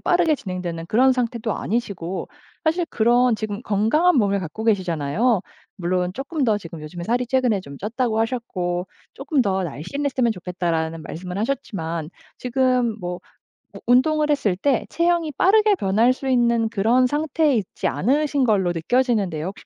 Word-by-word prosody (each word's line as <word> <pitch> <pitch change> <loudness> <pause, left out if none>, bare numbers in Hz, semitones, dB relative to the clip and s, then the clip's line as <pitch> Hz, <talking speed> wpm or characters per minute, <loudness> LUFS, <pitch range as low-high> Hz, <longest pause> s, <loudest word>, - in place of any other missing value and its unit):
빠르게 345 -3 +3
진행되는 180 - -5
그런 260 +6 +4
상태도 235 -3 -2
아니시고 195 -5 -3 0.4
사실 330 +2 +1
그런 240 +1 +3
지금 210 0 -4
건강한 250 - +2
몸을 200 -3 +2
갖고 185 +6 -6
계시잖아요. 185 - +1 0.4
물론 180 0 -1
"쪼끔 275 +2 -2
더 220 -4 +3
지금 165 -4 -9
요즘에 170 +3 -7
살이 245 +3 0
최근에 245 -5 +1
좀 140 -5 -11
쪘다."고 225 +2 -1
하셨고 185 -7 -2 0.3
"쪼끔 275 -1 0
더 190 -2 0
날씬했으면 245 - -1
좋겠다."라는 170 -4 -3
말씀을 180 +4 -7
하셨지만 170 - -3 0.3
지금 250 -2 +1
뭐 175 0 -4 0.6
우 - - -8
운동을 300 +5 +3
했을 215 -11 +1
때 265 +6 +1
체형이 335 -3 +1
빠르게 425 +2 +4
변할 225 - +2
수 265 +1 -5
있는 235 -2 +2
그런 230 +4 +3
상태에 300 +1 +1
있지 200 -4 -5
않으신 280 +3 +1
걸로 195 -6 +2
느껴지는데요. 190 - 0
혹시 195 - -9
225 Hz, 355 characters per minute, -22 LUFS, 180-260 Hz, 0.6 s, 그런